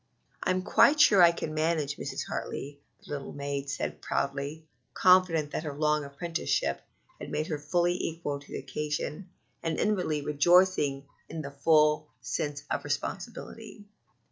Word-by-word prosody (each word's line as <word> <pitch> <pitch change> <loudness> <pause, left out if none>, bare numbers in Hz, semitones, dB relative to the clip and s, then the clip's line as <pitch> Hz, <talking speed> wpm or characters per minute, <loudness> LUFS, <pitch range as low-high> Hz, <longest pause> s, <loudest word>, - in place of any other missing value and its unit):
"I'm 185 0 0
quite 295 +8 +5
sure 205 -10 +7
I 170 -1 +8
can 160 -2 -5
manage, 155 -2 0
Mrs. - - -4
Hartley," 145 +1 -5 0.3
the - - -12
little 140 -2 -5
maid 140 -1 -4
said 135 - -4
proudly, 140 +3 -2 0.3
confident 180 -5 +4
that - - -2
her 150 -3 -6
long 150 0 +2
apprenticeship 160 +4 -2 0.4
had - - -7
made 155 - -1
her 155 -2 -3
fully 175 +4 +1
equal 155 -3 -3
to 140 - -17
the - - -3
occasion, 150 +4 -4 0.3
and 165 -1 -2
inwardly 180 -8 0
rejoicing 150 -2 +3 0.2
in 160 0 -5
the 140 - -6
full 150 +1 +3
sense 145 +4 -3
of - - -1
responsibility. 205 - -5
150 Hz, 145 wpm, -29 LUFS, 145-170 Hz, 0.4 s, I